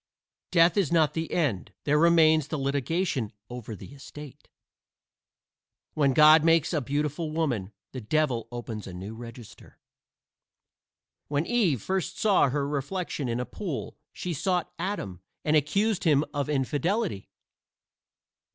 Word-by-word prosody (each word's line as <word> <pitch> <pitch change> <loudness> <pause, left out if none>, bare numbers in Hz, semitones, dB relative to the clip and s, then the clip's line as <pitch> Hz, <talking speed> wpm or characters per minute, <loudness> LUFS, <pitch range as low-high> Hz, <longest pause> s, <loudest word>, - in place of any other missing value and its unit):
Death 170 0 +4
is 190 -8 +2
not 160 -4 +3
the 165 0 -3
end; 135 - -1
there 150 +1 +2
remains 160 -2 +5
the 155 - -3
litigation 140 - -1 0.2
over 120 -3 -6
the 125 - -11
estate. 145 0 -12 1.4
When 140 -3 +2
God 155 0 +8
makes 165 0 +3
a 155 - +1
beautiful 150 +4 -2
woman, 135 - -1 0.2
the 130 - -6
devil 125 0 0
opens 115 -3 -6
a 90 - -8
new 95 +4 -7
register. 115 0 -12 1.5
When 145 +2 0
Eve 185 - +1
first 190 -1 -2
saw 200 -9 +3
her 140 +1 -1
reflection 145 0 -3
in 115 +1 -1
a 125 - -2
pool, 165 - -5 0.2
she 180 - -4
sought 180 +3 -1
Adam 165 - -4 0.2
and 155 0 +3
accused 195 +8 +1
him 150 -3 +3
of 145 -1 -2
infidelity. 150 - -1
150 Hz, 135 wpm, -27 LUFS, 130-170 Hz, 1.5 s, God